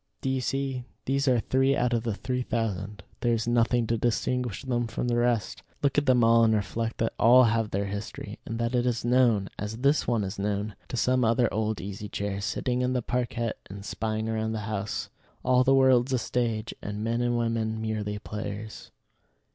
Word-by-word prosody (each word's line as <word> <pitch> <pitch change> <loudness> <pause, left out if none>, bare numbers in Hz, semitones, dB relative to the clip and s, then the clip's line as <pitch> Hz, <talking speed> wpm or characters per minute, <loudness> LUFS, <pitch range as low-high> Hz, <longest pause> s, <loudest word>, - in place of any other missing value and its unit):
Do 135 - 0
you 130 -1 0
see? 135 -1 -2 0.2
These 140 +1 0
are 125 -2 +4
three 135 +4 +2
out 125 -1 +1
of 115 - +2
the 110 -3 -2
three 125 +4 -2
thousand. 105 -4 -3 0.2
There 120 -1 +2
is 115 0 -3
nothing 120 0 +2
to 115 0 0
distinguish 120 0 -1
them 120 -3 -1
from 115 +2 -3
the 120 - +1
rest. 120 -4 0 0.2
Look 140 - +2
at 145 - -6
them 125 -2 +5
all, 115 0 +6
and 110 -1 +4
reflect 110 +3 -2
that 115 - 0
all 125 +3 +7
have 115 -2 +2
their 100 0 -1
history; 100 +1 -6
and 115 - -5
that 115 +1 -1
it 125 0 +2
is 120 -1 -1
known, 120 -5 +3
as 105 +2 -4
this 140 +4 +2
one 115 -3 +1
is 95 0 -5
known, 105 +1 -2
to 125 - -4
some 125 +1 +2
other 115 0 +2
old 110 -1 -1
Easy 100 +3 -6
Chair, 100 -1 -3
sitting 125 +4 -1
in 125 0 +1
the 125 -2 -1
parquette 120 -2 -2
and 100 0 -8
spying 110 0 -2
round 110 0 -1
the 110 - -3
house. 105 -1 -3 0.3
"All 125 0 +4
the 135 +1 +4
world's 130 -1 +4
a - - +3
stage, 115 -2 -1
and 105 +1 -4
men 115 +2 0
and 120 0 +1
women 115 -1 -1
merely 110 -2 -2
players." 105 0 -6
115 Hz, 205 wpm, -27 LUFS, 105-125 Hz, 0.3 s, all